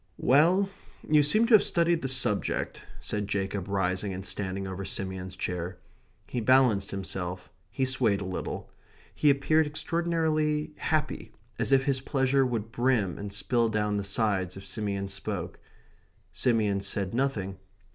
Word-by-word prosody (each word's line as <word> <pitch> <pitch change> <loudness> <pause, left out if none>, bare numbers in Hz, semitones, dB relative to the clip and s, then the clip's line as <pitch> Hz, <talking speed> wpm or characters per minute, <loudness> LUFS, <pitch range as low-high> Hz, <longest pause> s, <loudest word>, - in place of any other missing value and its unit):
"Well, 170 +9 +4 0.4
you 150 -1 +5
seem 215 +11 +4
to 235 - +2
have 215 - +8
studied 170 -1 +2
the 135 - -2
subject," 130 -6 0 0.2
said 105 -1 -3
Jacob, 100 -1 -2
rising 95 0 -1
and 95 +1 -6
standing 95 -1 -3
over 95 +1 -5
Simeon's 95 -1 -4
chair. 90 0 -4 0.5
He 120 - -3
balanced 115 -5 +4
himself; 95 -2 -5 0.2
he 130 - -1
swayed 125 -6 +2
a 100 - -5
little. 95 0 -5 0.4
He 150 - +3
appeared 150 +3 +3
extraordinarily 155 -1 0
happy, 150 -8 -2 0.3
as - - 0
if 135 -1 +5
his 135 -2 +1
pleasure 135 0 +2
would 115 -2 -3
brim 120 -7 +1
and 100 0 -5
spill 115 +3 +1
down 105 -1 0
the 100 - -2
sides 100 -3 0
if 95 - -10
Simeon 100 -2 -2
spoke. 100 -2 -4 0.7
Simeon 105 -5 +1
said 100 0 -1
nothing. 110 -8 -1
110 Hz, 145 wpm, -28 LUFS, 95-140 Hz, 0.7 s, have